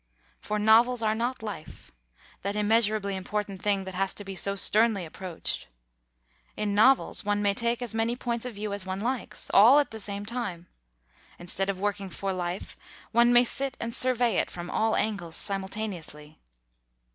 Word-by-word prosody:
For 210 - -3
novels 230 +3 +4
are 215 0 +2
not 235 +2 -2
life, 200 -8 -8 0.5
that 200 +1 -3
immeasurably 210 -1 +2
important 195 0 -4
thing 200 -2 +1
that 190 0 -7
has 195 +1 0
to 205 - -7
be 195 -1 -7
so 200 +2 +1
sternly 210 -1 +3
approached; 175 +1 -5 0.9
in 210 -1 -1
novels 255 +6 +4
one 205 0 0
may 200 -1 +3
take 235 +3 -1
as 235 - -5
many 225 +2 0
points 240 -2 -3
of 250 -3 -6
view 205 0 -4
as 200 -1 0
one 190 0 -4
likes, 245 +2 -3
all 230 +8 +8
at 290 - +2
the 220 - -7
same 200 0 -5
time; 205 -7 -4 0.7
instead 185 +3 -3
of 195 -2 -2
working 200 -1 -2
for 195 +1 -3
life, 180 0 -4 0.4
one 235 +1 +5
may 245 0 +7
sit 270 +2 -2
and 230 0 -4
survey 245 -4 +3
it - - 0
from 175 0 -7
all 220 0 +1
angles 200 -7 -2
simultaneously. 190 -7 -4
210 Hz, 170 wpm, -27 LUFS, 195-230 Hz, 0.9 s, all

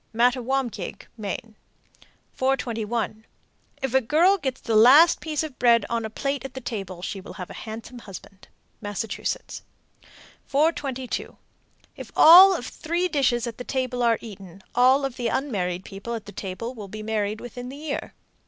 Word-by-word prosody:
Mattawamkeag, 245 -3 0
Me. 205 -4 -3 1.0
421. 230 -4 -2 0.6
If 265 -2 -1
a 265 - +5
girl 340 - +3
gets 265 -5 -3
the 225 - -2
last 275 +10 +7
piece 310 -1 -2
of 300 -4 -8
bread 235 -1 +4
on 230 -1 -1
a - - -4
plate 275 +5 -3
at 270 -1 -8
the - - -4
table, 195 -7 -6
she 195 0 -4
will - - -10
have 180 - -8
a - - -9
handsome 230 +3 -8
husband. 195 -2 -12 0.3
Massachusetts. 205 +1 -4 0.9
422. 275 -4 -1 0.6
If - - -10
all 370 +4 +9
of 250 - -5
three 340 +6 -2
dishes 255 -6 +1
at 235 -1 -6
the - - -4
table 255 -1 -2
are 230 -2 +3
eaten, 195 -4 -11
all 260 +3 +4
of 265 -2 -5
the 240 -2 -1
unmarried 190 -9 -2
people 205 +4 -6
at 225 - -7
the 205 - -9
table 205 +5 -5
will 215 -5 -8
be 215 +2 -8
married 215 -1 -2
within 245 +1 -8
the 275 - -9
year. 295 -1 -5
240 Hz, 160 wpm, -24 LUFS, 215-270 Hz, 1.0 s, all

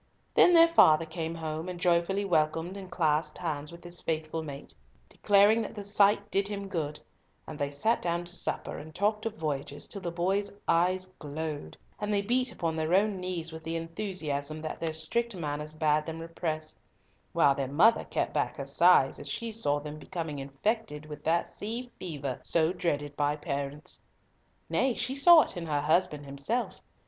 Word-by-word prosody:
Then 355 - +6
their 330 0 +8
father 165 - +6
came 160 0 -4
home, 160 +1 -4
and 180 -1 -6
joyfully 180 +3 +2
welcomed 165 +1 +1
and 195 -2 -8
clasped 155 -3 0
hands 150 -4 -3
with 170 0 -12
his 175 0 -3
faithful 160 0 -2
mate, 140 -3 -8 0.3
declaring 205 - +4
that 220 - -6
the 205 - -5
sight 205 0 +3
did 195 0 +2
him 200 -1 -4
good; 155 -5 -3 0.5
and 155 -1 -8
they 145 -1 0
sat 180 +12 +1
down 170 0 -1
to 175 - -6
supper - - -2
and 155 +2 -11
talked 210 +3 +1
of 220 - -5
voyages, 145 -4 -3
till 200 - -7
the 175 - -3
boys' 190 +4 0 0.2
eyes 185 +2 +2
glowed, 150 0 -5 0.2
and 210 0 -2
they 200 -1 +1
beat 250 +3 +1
upon 165 -6 -2
their 160 +2 +1
own 205 0 +2
knees 180 -3 -3
with 160 0 -9
the 165 +1 -3
enthusiasm 165 -4 -3
that 155 - -4
their 165 -1 -1
strict 205 +9 -2
manners 150 -2 -4
bade 155 0 +2
them 160 0 -4
repress; 165 -1 -4 0.6
while 140 - +4
their 135 -1 -2
mother 180 - +4
kept - - -2
back - - -1
her - - -4
sighs - - +4
as - - -6
she 230 -1 -3
saw 145 -10 0
them 150 +1 -7
becoming 160 -4 -5
infected 150 +4 -2
with 150 -1 -9
that 165 +2 +1
sea 235 +4 -5
fever 145 -7 -4
so 165 +1 +2
dreaded 145 -5 -2
by 145 0 +1
parents. 145 0 -5 0.7
Nay, 260 -2 +1
she 260 - -1
saw 320 +4 +8
it - - -6
in 170 -2 -5
her 145 -2 0
husband 155 -1 +1
himself. 140 - -3
165 Hz, 185 wpm, -29 LUFS, 150-200 Hz, 0.7 s, their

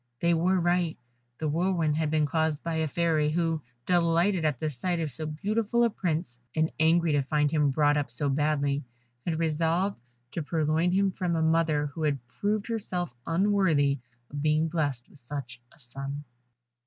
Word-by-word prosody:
They 170 0 +3
were 180 +3 +2
right, 175 -1 +1 0.4
the 155 - -2
whirlwind 165 -1 +1
had 155 -1 0
been 155 -1 +2
caused 160 0 0
by 165 -1 -2
a 160 0 +1
Fairy, 155 -1 +1
who, 165 0 0 0.2
delighted 175 +1 +2
at 150 -5 0
the 155 - -1
sight 170 +5 -2
of 155 -3 -2
so 155 +5 -5
beautiful 215 +9 0
a 235 - +3
Prince, 165 - -2 0.2
and 160 0 +1
angry 165 +1 +4
to 145 -1 +3
find 150 +1 +1
him 150 -3 +3
brought 145 +1 +3
up 145 - -1
so 120 +5 +1
badly, 145 0 +1 0.4
had 165 -2 0
resolved 165 +4 0 0.3
to 170 - -3
purloin 160 +2 +1
him 195 +1 +2
from 180 -2 -1
a 160 - +1
mother 160 -2 +2
who 165 - -6
had 150 -2 +1
proved 205 - -1
herself 185 - -3
unworthy 165 -6 +2 0.3
of 145 0 -4
being 155 +1 +2
blessed 145 -7 -2
with 150 - -19
such 120 -2 -7
a - - -21
son. 140 +2 -6
160 Hz, 180 wpm, -28 LUFS, 150-175 Hz, 0.4 s, angry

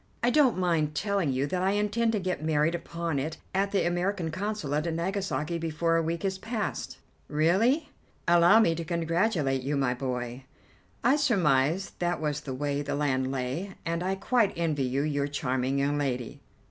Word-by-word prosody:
I 245 - +4
don't 265 -4 +4
mind 165 -5 +1
telling 200 -7 0
you 130 +2 0
that 180 +5 -2
I 190 +1 +2
intend 210 +3 +1
to 210 - +1
get 185 -5 -3
married 155 +1 +2
upon 170 -3 -3
it 155 +4 -3 0.2
at 195 +1 +1
the 200 - +1
American 175 -1 -1
Consulate 170 -5 -2
at 165 - -1
Nagasaki 170 -2 -2
before 165 +1 0
a 165 - +3
week 165 +3 -2
is 190 0 -1
past." 225 -1 -4 0.3
"Really? 195 - +2 0.4
Allow 175 +5 +6
me 165 -7 +3
to 165 +1 -4
congratulate 165 -4 0
you, 140 +3 -1
my 135 -3 +1
boy. 125 0 -4 0.6
I 260 +5 +4
surmised 180 - +1
that 175 0 0
was 150 -1 -2
the 140 -3 -5
way 145 +1 -1
the 145 - -2
land 130 -3 0
lay, 135 +9 -3
and 170 +1 -1
I 190 +2 0
quite 220 +1 +2
envy 155 -5 0
you 135 +3 0
your 145 -2 0
charming 130 -1 -1
young 145 +1 +1
lady." 125 -4 -3
165 Hz, 180 wpm, -28 LUFS, 145-190 Hz, 0.6 s, Allow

